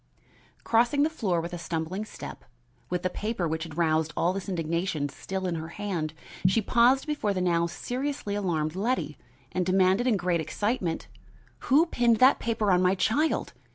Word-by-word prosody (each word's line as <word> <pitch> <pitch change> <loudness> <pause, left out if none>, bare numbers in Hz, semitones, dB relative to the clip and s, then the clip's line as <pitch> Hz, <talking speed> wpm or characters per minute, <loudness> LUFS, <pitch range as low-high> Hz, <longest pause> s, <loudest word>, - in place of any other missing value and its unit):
Crossing 240 +5 +3
the 315 - +1
floor 190 - 0
with 170 +2 -5
a 175 - -4
stumbling 170 +4 -3
step, - - -9 0.5
with 180 0 -2
the 185 - +1
paper 210 -4 -2
which 160 0 -2
had 160 -3 -10
roused 160 -2 +2
all 175 +2 +2
this 195 +1 -5
indignation 170 -3 -1
still 190 +6 -5
in 180 - -1
her 160 -1 -4
hand, 170 -4 -4 0.3
she 190 +5 +3
paused 245 +5 +3
before 290 -10 -1
the - - 0
now 170 -2 +2
seriously 250 +2 -3
alarmed 170 -6 -1
Letty, 205 - -1 0.4
and 185 - 0
demanded 190 +5 +3
in 225 -5 +3
great 175 -2 0
excitement: 185 - -2 0.6
"Who 295 +5 +6
pinned 240 -8 +2
that 260 +4 +6
paper 220 -3 0
on 180 0 +4
my 185 +1 +3
child? 260 +12 +1
185 Hz, 175 wpm, -27 LUFS, 170-230 Hz, 0.6 s, Who